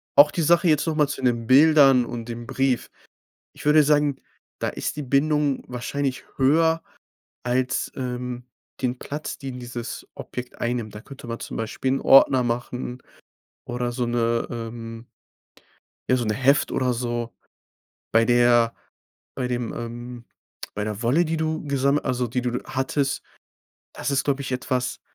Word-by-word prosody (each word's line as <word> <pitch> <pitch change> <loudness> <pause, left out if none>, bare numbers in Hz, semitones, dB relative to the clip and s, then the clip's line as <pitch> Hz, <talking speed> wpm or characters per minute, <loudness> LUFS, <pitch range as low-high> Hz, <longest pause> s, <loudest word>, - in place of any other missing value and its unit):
Auch 145 +1 +8
die 170 - -1
Sache 170 +3 +4
jetzt 155 +1 +2
noch 160 - 0
mal 150 -2 +3
zu 145 - -5
den 120 -2 +1
Bildern 135 -2 +6
und 115 -1 -6
dem 120 0 -6
Brief. 135 -1 0 0.6
Ich - - -12
würde 150 +1 +6
sagen, 145 -2 +2 0.4
da - - 0
ist - - -4
die 150 - -3
Bindung 145 +1 +1
wahrscheinlich 130 +2 -3
höher 160 +4 +3 0.6
als, 125 +1 0
ähm, 125 -1 -4 0.4
den 125 0 -1
Platz, 150 +2 -5
den 130 -3 -6
dieses 120 -1 -6
Objekt 125 0 -7
einnimmt. 120 -3 -2
Da 105 - -7
könnte 135 0 -11
man 115 0 -4
zum - - -7
Beispiel 115 +4 -2
'n 135 - -1
Ordner 135 -1 +6
machen 125 +1 -3 0.6
oder 120 0 -2
so 120 0 -1
'ne, 120 -1 0
ähm 115 0 -6 1.0
ja, 130 - +4
so 120 - -1
'ne 110 - +1
Heft 135 +4 +3
oder 130 -1 +1
so. 120 -1 -3 0.8
Bei 115 +1 +4
der 120 -1 +4 0.6
bei 125 - -2
dem, 120 -2 -2
ähm 120 +1 -7 0.5
bei 105 - -2
der 105 +2 -4
Wolle, 135 +9 +3
die 160 0 -1
du 160 0 -1
gesamm 140 +1 +2
also, 125 -1 0
die 125 +2 -1
du 125 0 -1
hattest, 135 +1 -1 0.7
das - - -3
ist, 140 -1 +1
glaube 140 -1 0
ich, 135 - -5
etwas, 125 0 -2
125 Hz, 160 wpm, -24 LUFS, 120-140 Hz, 1.0 s, Auch